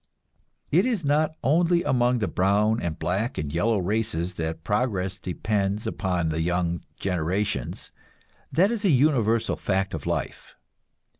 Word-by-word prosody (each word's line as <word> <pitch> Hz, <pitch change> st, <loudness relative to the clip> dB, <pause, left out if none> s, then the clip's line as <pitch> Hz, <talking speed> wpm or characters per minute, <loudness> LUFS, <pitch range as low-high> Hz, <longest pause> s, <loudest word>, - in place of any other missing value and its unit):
It 175 Hz, +6 st, +5 dB
is 215 Hz, -, -1 dB
not 150 Hz, +2 st, +2 dB
only 170 Hz, +6 st, +3 dB
among 125 Hz, -5 st, +2 dB
the 105 Hz, -4 st, -1 dB
brown 105 Hz, +4 st, +2 dB
and 85 Hz, -2 st, -3 dB
black 100 Hz, +8 st, -1 dB
and 75 Hz, -1 st, -3 dB
yellow 105 Hz, +6 st, +2 dB
races 95 Hz, -2 st, -1 dB
that 80 Hz, -1 st, -4 dB
progress 95 Hz, -3 st, -1 dB
depends 100 Hz, +3 st, -1 dB
upon 90 Hz, -5 st, -1 dB
the 80 Hz, +1 st, -1 dB
young 85 Hz, 0 st, 0 dB, 0.2 s
generations; 90 Hz, -, -2 dB, 0.6 s
that 185 Hz, -, +3 dB
is 225 Hz, -3 st, -3 dB
a 200 Hz, -, +3 dB
universal 125 Hz, -6 st, +3 dB
fact 95 Hz, 0 st, -1 dB
of 80 Hz, -4 st, -5 dB
life. -, -, -4 dB
105 Hz, 140 wpm, -25 LUFS, 90-125 Hz, 0.6 s, It